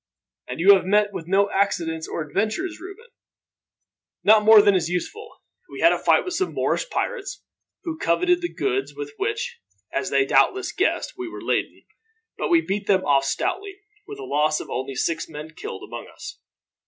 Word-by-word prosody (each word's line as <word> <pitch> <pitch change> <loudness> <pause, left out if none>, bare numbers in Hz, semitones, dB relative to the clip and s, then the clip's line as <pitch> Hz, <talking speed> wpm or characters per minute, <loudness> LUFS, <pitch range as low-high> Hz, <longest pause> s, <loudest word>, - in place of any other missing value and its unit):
"And 125 - -6
you 195 +4 +8
have 190 - +3
met 205 +1 +2
with 165 -3 -6
no 200 +2 +2
accidents 170 -5 -1
or 165 - -3
adventures, 215 - -2
Reuben?" 395 +5 -10 1.2
"Not 215 0 +6
more 220 0 +9
than 205 -1 +5
is 175 -3 0
useful. 430 - -5 0.3
We - - -8
had - - +6
a - - -2
fight - - +3
with 365 - -4
some 380 +1 -2
Moorish - - -1
pirates, 440 -6 -4 0.4
who 330 -3 -5
coveted 355 - +2
the 345 - -3
goods 400 0 -2
with 430 0 -7
which, 440 +4 -3 0.3
as - - -1
they 405 - +2
doubtless 390 -1 +2
guessed, - - -1
we 365 -2 -4
were - - -9
laden; - - -2 0.5
but - - -3
we 340 -2 +5
beat 200 -6 -3
them 190 -2 +2
off 140 -1 +3
stoutly, 390 - -2 0.3
with 420 0 -8
a 415 - -8
loss 155 - +1
of - - -9
only 130 +1 -4
six 165 +6 -2
men 155 0 -8
killed 95 -10 -8
among - - -8
us. - - -10
210 Hz, 185 wpm, -23 LUFS, -, 1.2 s, more